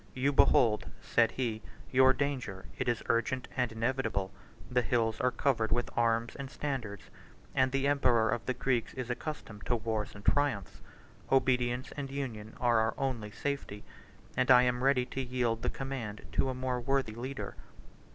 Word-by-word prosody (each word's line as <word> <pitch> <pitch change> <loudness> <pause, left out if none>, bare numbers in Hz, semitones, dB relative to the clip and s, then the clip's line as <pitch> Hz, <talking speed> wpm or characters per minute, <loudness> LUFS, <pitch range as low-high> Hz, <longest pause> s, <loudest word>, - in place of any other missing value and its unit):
"You 135 +2 +1
behold," 115 -5 +4
said 115 -1 +2
he, 115 -4 -2 0.3
"your 130 0 +6
danger: 130 -9 -2
it - - 0
is 120 - -1
urgent 125 +2 0
and 125 -3 0
inevitable. 115 -4 -1 0.4
The 125 0 +2
hills 115 -2 0
are 125 - +4
covered 120 -4 0
with 120 0 -1
arms 115 0 +1
and 140 -1 -6
standards; 125 - -4 0.5
and 130 0 +3
the 135 0 0
emperor 125 -6 +3
of 115 - -1
the 130 - 0
Greeks 125 -2 0
is 125 -2 -3
accustomed 125 -6 -6
to 120 - +2
wars 110 -2 -2
and 100 0 -11
triumphs. 140 -10 +1 0.5
Obedience 125 -1 +2
and 140 -2 -4
union 120 -6 -5
are 120 -2 +3
our 110 0 +1
only 125 -6 -2
safety; 120 -4 -4 0.5
and 130 0 +1
I 125 -1 +8
am 125 0 +1
ready 135 -2 +3
to 130 +1 -4
yield 120 -3 -1
the - - 0
command 130 -6 -5
to 135 - +1
a 130 - -2
more 130 -1 -2
worthy 135 -3 0
leader." 130 +4 -5
125 Hz, 170 wpm, -31 LUFS, 115-130 Hz, 0.5 s, I